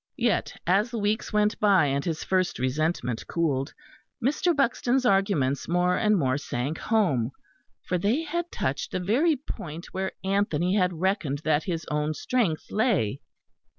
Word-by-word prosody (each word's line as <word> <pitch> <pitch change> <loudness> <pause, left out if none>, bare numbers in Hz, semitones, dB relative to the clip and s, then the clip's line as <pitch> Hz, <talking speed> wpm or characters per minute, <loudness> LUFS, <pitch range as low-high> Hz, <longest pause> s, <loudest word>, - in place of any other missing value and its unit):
Yet - - 0
as 195 +6 +3
the 235 - -4
weeks 210 +1 -1
went 210 0 +1
by, 200 -6 +5
and 140 0 0
his 165 -3 -3
first 185 -1 0
resentment 130 -2 -1
cooled, 140 -5 0 0.5
Mr. 300 +7 +1
Buxton's 260 -1 +1
arguments 195 - +2
more 180 +1 +2
and 210 +1 +3
more 130 -3 +1
sank 140 +2 -3
home, 175 - +1 0.6
for 180 - 0
they 225 - +1
had 345 +2 -3
touched 485 - -2
the - - 0
very 255 - +2
point 170 - -7
where 190 0 -2
Anthony 190 -3 +1
had 180 -4 +1
reckoned 175 -7 0
that 155 -1 +1
his 170 -4 -3
own 150 +1 0
strength 210 -10 -1
lay. 195 - +1
185 Hz, 150 wpm, -26 LUFS, 150-215 Hz, 0.6 s, by